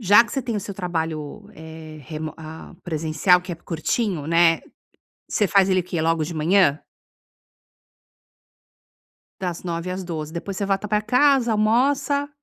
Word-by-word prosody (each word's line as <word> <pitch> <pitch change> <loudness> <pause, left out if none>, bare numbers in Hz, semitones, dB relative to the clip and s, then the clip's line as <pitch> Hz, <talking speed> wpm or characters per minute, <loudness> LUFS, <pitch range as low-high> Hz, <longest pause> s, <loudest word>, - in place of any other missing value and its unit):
Já 210 +2 +6
que 220 - -10
você 270 - -1
tem 235 -4 -3
o - - -2
seu 200 +1 -7
trabalho, 160 -5 -4
eh, 160 0 -10
remo 155 +2 -6
ah, 160 0 -10
presencial, 160 +2 +2
que 180 0 -7
é - - -3
curtinho, 165 +1 -2
né, 165 0 +4 0.7
você 210 - +1
faz 195 +1 +4
ele 185 0 +3
o - - -4
quê, 175 -2 -3
logo 165 0 +1
de 165 - -6
manhã? 160 -1 +3 2.6
Das 175 -3 -4
9h 170 0 -3
às 185 +1 -4
12h. 160 -3 -5
Depois 190 +3 -5
você 200 - -1
volta 195 +1 -1
pra 210 0 +1
casa, 250 +2 +3
almoça 275 +6 +2
180 Hz, 160 wpm, -23 LUFS, 160-210 Hz, 2.6 s, Já